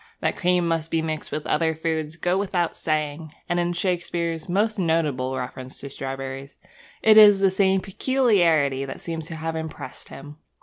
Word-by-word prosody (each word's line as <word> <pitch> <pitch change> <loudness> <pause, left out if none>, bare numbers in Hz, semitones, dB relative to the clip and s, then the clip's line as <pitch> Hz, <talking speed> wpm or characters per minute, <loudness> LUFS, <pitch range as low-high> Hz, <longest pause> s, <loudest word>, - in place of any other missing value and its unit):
That - - 0
cream 180 -1 +1
must 165 -1 -1
be 165 -1 0
mixed 155 -1 -4
with 150 0 -3
other 160 -1 +1
foods 160 -1 -2
goes 175 +2 0
without 185 -4 -1
saying; 155 0 -3
and 175 - 0
in 175 0 0
Shakespeare's 175 -2 -2
most 210 +3 +1
notable 150 -7 0
reference 130 +1 -7
to 140 - -7
strawberries 135 0 -6 0.5
it 215 0 +7
is 205 -2 +9
the 195 -1 +3
same 190 0 +2
peculiarity 180 - +2
that 135 - -6
seems 165 -2 -5
to 165 - -6
have 160 +1 -4
impressed 160 -5 -7
him. 145 +2 -11
165 Hz, 170 wpm, -24 LUFS, 150-180 Hz, 0.5 s, is